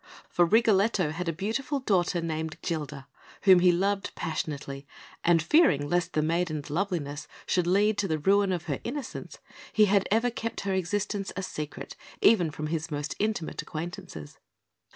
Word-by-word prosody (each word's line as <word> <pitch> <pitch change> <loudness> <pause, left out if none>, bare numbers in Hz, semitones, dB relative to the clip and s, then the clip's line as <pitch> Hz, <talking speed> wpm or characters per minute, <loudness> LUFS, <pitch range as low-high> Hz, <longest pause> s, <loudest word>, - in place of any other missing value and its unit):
For 175 - +3
Rigoletto 205 -4 +3
had 170 +2 -3
a - - +2
beautiful 225 - -2
daughter, 180 -7 +1
named 160 -1 -3
Gilda, 150 -5 -4 0.4
whom 190 -2 +7
he 180 0 +5
loved 195 +3 0
passionately, 145 -3 -4 0.4
and 170 -2 +4
fearing 160 - +4
lest 175 +3 0
the 155 - +1
maiden's 155 -3 -1
loveliness 160 -5 -2 0.2
should 180 -2 +1
lead 205 +3 +3
to 200 - +1
the 160 -3 0
ruin 195 +5 +3
of 175 -3 -2
her 140 -5 -2
innocence, 270 +3 -6 0.3
he 215 - +5
had 200 -1 +2
ever 230 +3 +2
kept 230 -1 -4
her 195 -1 -1
existence 195 +2 -1
a 190 - -3
secret 150 -5 -6 0.2
even 190 -7 +5
from 150 0 -5
his 160 +1 -2
most 145 -1 -3
intimate 210 -6 -1
acquaintances. 155 - -7
175 Hz, 160 wpm, -28 LUFS, 155-205 Hz, 0.4 s, whom